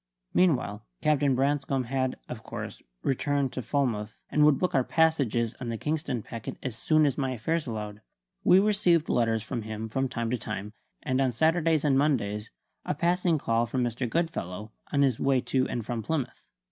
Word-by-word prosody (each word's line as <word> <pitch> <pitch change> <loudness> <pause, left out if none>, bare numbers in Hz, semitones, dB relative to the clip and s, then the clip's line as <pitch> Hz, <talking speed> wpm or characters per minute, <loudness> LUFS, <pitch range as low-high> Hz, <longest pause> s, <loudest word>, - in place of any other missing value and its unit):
Meanwhile, 125 - +2 0.2
Captain 145 -3 +3
Branscome 140 0 +1
had, 130 +1 -1
of - - -6
course, - - -7 0.2
returned 140 0 0
to 130 - -3
Falmouth, 115 -4 -1
and 150 - +4
would 150 -2 +6
book 180 +5 0
our 130 - +3
passages 135 -8 +2
on 120 - -3
the 115 - -2
Kingston 150 -5 -2
packet 115 -2 -7
as 125 -4 -3
soon 155 +6 +3
as 140 0 0
my 130 -2 0
affairs 150 +7 -1
allowed. 105 -2 -5 0.4
We 180 - +7
received 195 -5 +3
letters 115 -2 +2
from 120 +1 -3
him 110 +1 -5
from 135 +3 -1
time 115 -2 -2
to 125 - 0
time, 105 -1 -5 0.3
and 130 +1 +1
on 130 -2 +2
Saturdays 160 +3 +2
and 135 -2 +4
Mondays 110 -8 0 0.3
a - - -2
passing 170 +1 +2
call 115 -3 +1
from 125 +2 0
Mr. 120 +1 -2
Goodfellow, 110 - -2 0.2
on 140 -1 +3
his 130 -5 +2
way 135 -1 +3
to 130 +1 0
and 120 -3 -3
from 120 -1 -2
Plymouth. 130 +1 -3
130 Hz, 185 wpm, -28 LUFS, 115-150 Hz, 0.4 s, We